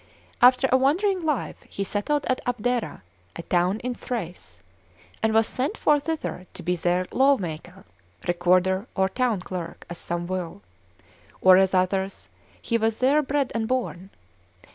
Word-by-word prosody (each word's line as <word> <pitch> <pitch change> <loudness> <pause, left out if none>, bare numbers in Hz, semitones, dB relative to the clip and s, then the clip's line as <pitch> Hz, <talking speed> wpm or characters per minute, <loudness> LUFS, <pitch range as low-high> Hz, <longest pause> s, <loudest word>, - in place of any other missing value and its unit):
After 255 +2 +6
a 260 - +6
wandering 360 +9 +2
life, 300 -6 -1
he 200 - -3
settled 240 +9 -1
at 255 - 0
Abdera, 245 - -2 0.3
a 170 - -6
town 180 +5 +1
in 250 +1 -2
Thrace, 180 - -6 0.6
and 220 - +2
was 220 0 +4
sent 260 +5 -3
for 295 -1 +3
thither 295 - -4
to - - -8
be 180 0 0
their 175 +1 0
lawmaker, 190 - 0 0.4
recorder, 185 +3 +2
or 190 -1 +2
town 235 -3 0
clerk, 180 -2 -7
as 175 - -5
some 175 0 -3
will; 175 - -5 0.8
or 185 0 +7
as 190 0 +3
others, 190 +1 -1 0.3
he 230 -1 -1
was 220 0 0
there 275 +4 +4
bred 280 -1 -1
and 225 -1 -1
born. 220 -7 -2
210 Hz, 150 wpm, -25 LUFS, 180-255 Hz, 0.8 s, or